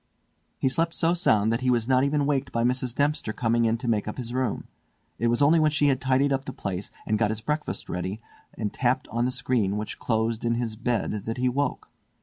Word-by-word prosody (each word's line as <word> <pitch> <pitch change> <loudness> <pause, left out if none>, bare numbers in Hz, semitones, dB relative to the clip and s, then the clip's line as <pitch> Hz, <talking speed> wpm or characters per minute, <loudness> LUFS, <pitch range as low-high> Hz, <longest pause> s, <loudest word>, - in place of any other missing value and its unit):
He - - +1
slept 165 +5 0
so 165 +1 +2
sound 110 - +2
that 115 - -1
he 130 - +1
was 120 -2 +2
not 130 0 +4
even 140 0 +1
waked 140 -2 0
by 115 - 0
Mrs. 125 0 0
Dempster 145 -5 0
coming 115 +1 +1
in 115 +1 +2
to 120 - -6
make 110 -3 +1
up 105 - -4
his 120 -2 -5
room. 130 -1 -1 0.5
It 120 - +2
was 120 +4 +2
only 160 +3 +5
when 155 -1 +4
she 145 -1 +2
had 135 -1 +1
tidied 135 +1 +2
up 135 0 -2
the 135 - -5
place 95 0 -4 0.2
and 110 -1 0
got 105 -2 +2
his 110 0 -2
breakfast 150 +6 -3
ready 90 +4 -3 0.4
and 105 -3 -3
tapped 130 0 0
on 120 +2 0
the 125 - 0
screen 125 -6 0
which 105 0 -5
closed 110 -1 0
in 115 0 +1
his 115 -2 -2
bed 110 -3 -2
that 115 - -2
he 125 0 +1
woke. 140 +1 -2
125 Hz, 235 wpm, -26 LUFS, 110-135 Hz, 0.5 s, only